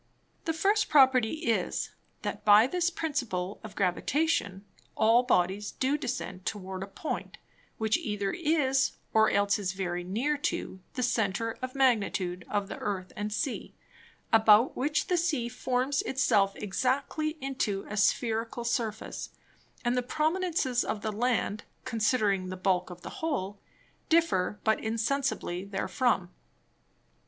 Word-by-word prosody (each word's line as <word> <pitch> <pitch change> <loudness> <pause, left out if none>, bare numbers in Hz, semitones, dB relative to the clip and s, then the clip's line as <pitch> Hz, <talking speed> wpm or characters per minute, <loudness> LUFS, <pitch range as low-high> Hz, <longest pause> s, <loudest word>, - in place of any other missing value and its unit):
The 325 - 0
first 405 +6 +2
Property 265 +2 +4
is, 230 - 0 0.3
That - - -4
by 210 +1 +7
this 350 +5 +1
Principle 245 - -3
of 215 -2 -9
Gravitation, 200 - 0 0.3
all 225 +2 +5
Bodies 200 -4 +1
do 270 +2 +1
descend 250 -9 -4
towards 190 -2 -4
a - - -7
Point, 205 +10 -5 0.4
which 220 -1 +2
either 205 -2 -2
is, 290 -5 +2 0.2
or 220 0 +5
else 200 0 +2
is 190 -2 -2
very 180 -2 -3
near 240 +12 0
to 190 -8 -3 0.2
the 250 - -1
Center 225 -1 0
of 255 +1 -5
Magnitude 205 -9 +1
of 205 -1 -1
the - - -7
Earth 190 -3 -3
and 210 0 -3
Sea, 250 +5 -3 0.6
about 220 +2 +6
which 295 +3 0
the 360 - +1
Sea 310 -8 0
forms 255 +3 0
it 265 - -5
self 200 -6 +3
exactly 275 +9 -1
into 255 -7 -2
a 210 - -5
Spherical 225 +3 +1
Surface, 225 -2 -2 0.6
and 240 +1 +2
the 250 - +2
Prominences 310 -2 0
of 210 - -3
the 215 - -1
Land, 220 -1 0 0.2
considering 210 -5 +1
the 185 - -5
Bulk 185 -1 +1
of 180 0 -10
the - - -8
whole, 205 -11 -2 0.5
differ 315 - +2
but 220 0 +1
insensibly 225 -4 -1
therefrom. 195 -1 0
225 Hz, 140 wpm, -29 LUFS, 200-270 Hz, 0.6 s, by